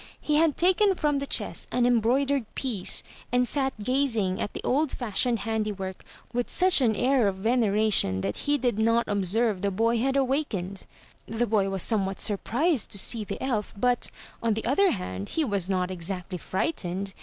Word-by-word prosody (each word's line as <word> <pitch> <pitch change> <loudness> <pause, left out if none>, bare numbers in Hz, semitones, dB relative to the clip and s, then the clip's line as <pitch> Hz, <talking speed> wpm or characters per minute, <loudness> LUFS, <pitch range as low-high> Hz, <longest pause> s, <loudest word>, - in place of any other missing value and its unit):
He 300 0 0
had 315 -2 +2
taken 375 +3 +3
from 295 -4 0
the 280 - -4
chest - - -1
an 245 -1 +2
embroidered 245 +3 +2
piece, 225 -9 0 0.3
and 250 0 +2
sat 270 0 0
gazing 225 -6 +1
at - - -3
the - - -6
old 290 +3 +1
fashioned 240 0 -1
handi 220 -1 -1
work 190 -2 -6 0.3
with 245 0 -1
such 370 -5 +4
an 225 -4 +2
air 250 -1 +2
of 195 - -1
veneration 215 - +1
that 100 +2 -3
he 290 0 +1
did 245 -5 -1
not 230 +1 +2
observe 205 +1 0
the 200 - +1
boy 225 +4 +1
had 270 +3 +1
awakened. 245 -9 -2 0.4
The 225 +2 -1
boy 205 -3 +1
was 195 -2 -1
somewhat 195 -4 -1
surprised 245 - 0
to - - -4
see 220 +3 +1
the - - -6
elf, 230 -6 -2
but, 245 +3 +1 0.3
on 230 -2 +1
the 220 - -4
other 330 +11 +3
hand, 100 - -4
he 320 - +2
was 200 -6 -1
not 185 -1 0
exactly 180 0 -3
frightened. 190 - -3
225 Hz, 180 wpm, -26 LUFS, 195-265 Hz, 0.4 s, such